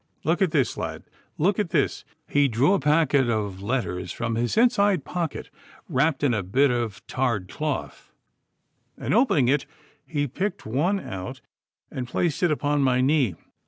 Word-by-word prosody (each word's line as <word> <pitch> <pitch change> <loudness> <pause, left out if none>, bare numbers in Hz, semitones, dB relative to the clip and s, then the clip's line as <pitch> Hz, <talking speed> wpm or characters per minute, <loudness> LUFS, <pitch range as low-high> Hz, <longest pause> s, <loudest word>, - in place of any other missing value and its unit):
Look 165 +4 +1
at 190 - +4
this, 145 -5 0
lad! - - -4 0.3
Look 185 +6 +2
at 205 - 0
this!' 155 -5 0 0.2
He 145 0 +3
drew 130 - +3
a - - +2
packet 145 -3 +3
of 105 -4 -2
letters 105 -4 -2
from 115 -1 -3
his 120 - -1
inside 205 - +3
pocket, 170 -4 -4 0.4
wrapped 145 +3 +1
in 135 -4 +3
a 105 - 0
bit 125 +9 +2
of 115 -5 -3
tarred 120 -8 -1
cloth, 150 +8 -4 0.9
and - - -2
opening 210 - +3
it 140 +2 +1 0.4
he 145 -3 -2
picked 185 - -3
one 160 - +1
out 105 - -7 0.5
and 125 -2 -4
placed 160 +5 -1
it 175 - +3
upon 145 -1 +1
my 130 -2 +3
knee. 130 - +2
140 Hz, 160 wpm, -25 LUFS, 120-165 Hz, 0.9 s, at